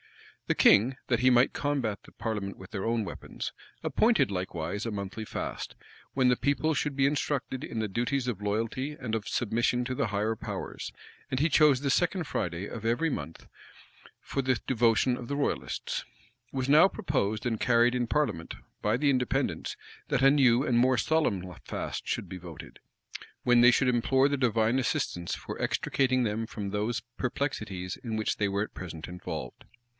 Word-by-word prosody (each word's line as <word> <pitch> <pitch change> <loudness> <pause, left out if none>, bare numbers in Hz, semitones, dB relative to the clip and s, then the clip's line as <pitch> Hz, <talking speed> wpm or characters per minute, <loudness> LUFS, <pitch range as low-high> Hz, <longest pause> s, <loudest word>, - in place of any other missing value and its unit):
The - - +2
king, 120 +6 +5
that 120 -3 +2
he 130 +1 +5
might 125 +1 +4
combat 135 -8 -1
the - - -16
parliament 105 -4 -4
with 95 - -12
their 95 -3 -3
own 115 -1 0
weapons, - - -6 0.3
appointed 225 - +3
likewise 90 +1 -3
a 115 - -2
monthly 100 +1 -5
fast, - - -5 0.4
when 130 -2 +3
the 125 - +5
people 140 +4 +1
should 145 0 -1
be 135 0 +3
instructed 140 -2 -1
in 115 - -4
the 110 - 0
duties 120 +5 -1
of 110 -5 -2
loyalty, 115 +7 -1
and 115 -3 -2
of 110 -1 -3
submission 120 +2 +1
to 130 - -3
the 115 - 0
higher 105 +2 0
powers; - - -6 0.4
and 130 - -1
he 155 - +4
chose 150 -4 +5
the 140 +1 -1
second 175 +3 +1
Friday 90 - -3
of 110 - -7
every 120 +9 +1
month 80 - -6 0.7
for 135 - -2
the 130 -2 +1
devotion 120 0 +3
of 120 -1 -8
the 140 - -1
royalists.[] 65 - -2 0.5
It - - -12
was 130 -1 0
now 155 +6 +7
proposed 110 - -1
and 115 -2 0
carried 120 0 +4
in 120 -1 0
parliament, 115 - -1 0.3
by 105 +2 +2
the 145 +2 +2
Independents, 125 -2 -1 0.3
that 130 - +1
a 135 - +8
new 130 -3 +4
and 120 -5 +2
more 130 +1 +4
solemn 105 - 0
fast - - -5
should - - -2
be 95 - -7
voted; 85 -3 -10 0.6
when 120 -1 +5
they 120 +1 +8
should 130 +2 +2
implore 130 +2 +3
the 145 - 0
divine 115 -1 +2
assistance 90 -8 -1
for - - -6
extricating 130 -2 +1
them 110 0 -1
from 100 -3 -5
those 110 +4 -1 0.2
perplexities 110 -9 -3
in 110 -3 -3
which 110 - 0
they 100 -1 +1
were 100 +1 0
at - - -8
present 80 -3 -7
involved. 90 -8 -6
120 Hz, 180 wpm, -29 LUFS, 105-130 Hz, 0.7 s, a